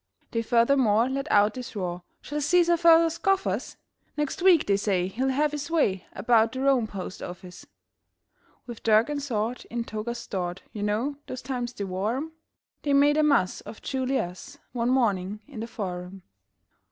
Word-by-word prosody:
They 230 - 0
furthermore 235 -1 +3
let 275 +2 -3
out 210 0 +4
this 250 -3 -8
roar: 180 -3 -3 0.2
"Shall 295 +1 -4
Cæsar 345 +3 +4
further 330 -1 +6
scoff 385 +4 +1
us? - - -3 0.4
Next 295 +5 -2
week, 360 -4 +5
they 200 - +3
say, 195 -3 0
he'll 245 +8 -1
have 290 +3 +1
his 295 0 -5
way 210 - +1
About 225 +2 +3
the 260 - -4
Rome 265 -4 +3
postoffice." 180 -2 -8 1.0
With 240 -3 -9
dirk 220 +4 +3
and 290 -1 -2
sword 240 -3 -2
in 235 0 -2
togas 230 +2 -4
stored 180 -5 -4
You 210 - -5
know 220 +8 -1
those 255 - -6
times 250 -2 -3
they 205 - -5
wore 195 +5 -2
'em 315 +4 -5 0.5
They 285 - 0
made 290 +2 +5
a - - +5
muss 280 -12 +2
of 220 - -11
Ju 265 -1 -2
li 265 +1 +1
us 185 +11 -5
One 240 -1 -1
morning 210 -5 +1
in 275 -6 -9
the 225 - -4
Forum. 185 -4 -6
235 Hz, 175 wpm, -26 LUFS, 205-280 Hz, 1.0 s, further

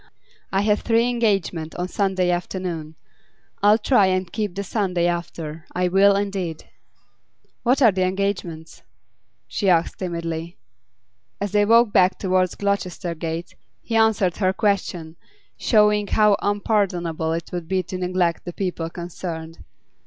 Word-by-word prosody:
I 195 - +2
have 210 0 +2
three 230 +1 +2
engagements 195 -9 0
on 180 0 -2
Sunday 185 -2 0
afternoon. 175 -3 -4 0.7
I'll 205 +2 +6
try 215 -3 +3
and 185 -1 -1
keep 210 -5 -2
the 200 - -3
Sunday 185 -4 0
after; 165 -2 -4
I 180 0 +1
will 195 +2 +5
indeed.' 195 -5 -3 1.0
'What 260 +3 +2
are 230 - +7
the 190 -1 -2
engagements?' 185 -4 -2 0.7
she 200 - 0
asked 170 -2 +2
timidly. 170 -2 -4 0.8
As 200 -1 -3
they 205 0 +3
walked 230 0 +5
back 185 -2 +4
towards 185 -2 +1
Gloucester 185 -4 -2
Gate, 165 +1 -5 0.3
he 230 - -3
answered 220 -5 +3
her 185 -2 +1
question, 185 -6 -1 0.4
showing 210 -2 +3
how 210 0 +4
unpardonable 180 -6 0
it 165 0 -5
would 175 -2 -5
be 190 +1 0
to 185 - -6
neglect 180 -2 0
the 175 - -6
people 175 -4 -3
concerned. 165 -2 -7
185 Hz, 140 wpm, -22 LUFS, 170-205 Hz, 1.0 s, are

